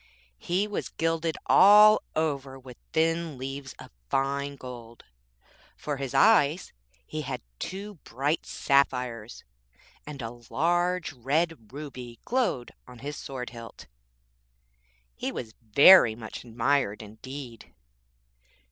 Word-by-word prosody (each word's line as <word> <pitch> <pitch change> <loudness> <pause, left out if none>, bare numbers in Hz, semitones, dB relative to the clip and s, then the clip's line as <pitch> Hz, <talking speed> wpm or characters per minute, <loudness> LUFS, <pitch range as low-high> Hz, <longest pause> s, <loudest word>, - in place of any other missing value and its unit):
He 190 +4 -1
was 210 - -4
gilded 165 0 -1
all 210 +2 +7
over 140 -4 -2
with 130 -2 -12 0.2
thin 165 -2 0
leaves 135 +1 -7
of - - -13 0.2
fine 140 +1 -1
gold, 120 -3 -11 0.7
for 145 -2 -4
eyes 170 -1 +4 0.3
he - - -5
had - - -5 0.2
two 200 -1 -6
bright 140 +7 -2
sapphires, 125 -5 0 0.6
and 140 -4 -7
a 120 +1 -8
large 175 +2 0
red 140 0 -2
ruby 130 -4 -8
glowed 240 - -1 0.2
on 125 -1 -12
his 145 +1 -4
sword 130 -4 -7
hilt. 115 -2 -11 1.3
He - - -3
was 110 -3 -7
very 115 - +7
much 110 -1 -9
admired 120 -2 0
indeed.' 120 +3 -10
140 Hz, 110 wpm, -27 LUFS, 120-165 Hz, 1.3 s, all